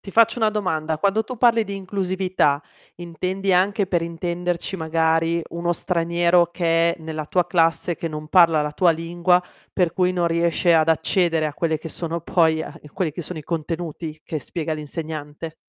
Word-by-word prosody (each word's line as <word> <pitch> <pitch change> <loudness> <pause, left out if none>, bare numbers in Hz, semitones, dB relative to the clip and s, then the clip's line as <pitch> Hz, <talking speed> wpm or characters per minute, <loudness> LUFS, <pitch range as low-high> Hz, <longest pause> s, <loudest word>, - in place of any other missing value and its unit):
Ti 195 - -10
faccio 230 +2 +4
una 220 - +3
domanda, 160 -7 -1
quando 200 +5 +1
tu 255 - -7
parli 230 -1 +4
di 200 - -6
inclusività, 185 -6 0 0.3
intendi 185 +3 -2
anche, 195 +3 +2
per 180 -2 +1
intenderci, 175 +2 -3
magari 165 0 +1
uno 170 0 -1
straniero 170 0 +2
che 170 -1 +2
è - - -19
nella 155 -1 -5
tua 180 +1 +1
classe, 165 0 +1
che 165 - -5
non 150 -1 -7
parla 165 -4 +5
la 150 - -2
tua 175 +3 +3
lingua 175 +2 +1 0.3
per 175 -3 +1
cui 180 0 +1
non 175 -1 0
riesce 170 +1 +2
ad 160 -1 +4
accedere 165 0 +2
a 150 - -4
quelli 160 0 -1
che 165 - -7
sono 170 +2 -4
poi 160 -2 +2 0.3
quelli 175 -5 -1
che 170 +4 -6
sono 160 +1 -7
i - - -7
contenuti 160 0 -5
che 155 - -3
spiega 160 +2 -4
l'insegnante? 155 0 -6
170 Hz, 175 wpm, -22 LUFS, 160-180 Hz, 0.3 s, parla